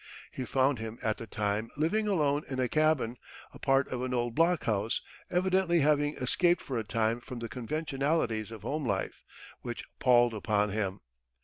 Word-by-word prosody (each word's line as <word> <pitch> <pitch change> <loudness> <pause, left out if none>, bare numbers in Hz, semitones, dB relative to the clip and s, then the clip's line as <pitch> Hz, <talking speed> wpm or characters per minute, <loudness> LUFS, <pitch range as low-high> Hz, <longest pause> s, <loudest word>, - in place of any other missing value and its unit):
He 130 - -4
found 130 0 +2
him 110 +1 -6
at 110 -1 0
the 115 - -7
time 105 +2 -1
"living 210 +8 +1
alone 150 -7 +2
in 130 -1 -3
a 130 - +2
cabin, 155 -5 +1 0.4
a - - -12
part 135 0 +3
of 125 -1 -3
an 125 0 -1
old 120 -1 -1
blockhouse," 120 - +1 0.3
evidently 180 -1 +2
having 145 0 +2
escaped 175 +7 +2
for 130 -4 -2
a - - -2
time 110 +2 0
from 125 - -8
the 115 0 -4
conventionalities 135 -2 -1
of 110 -3 -9
home 150 +1 -2
life, 100 -6 -2 0.4
which - - -5 0.2
palled 120 -1 +5
upon 105 -1 +1
him. 100 -2 -2
125 Hz, 175 wpm, -30 LUFS, 110-150 Hz, 0.4 s, palled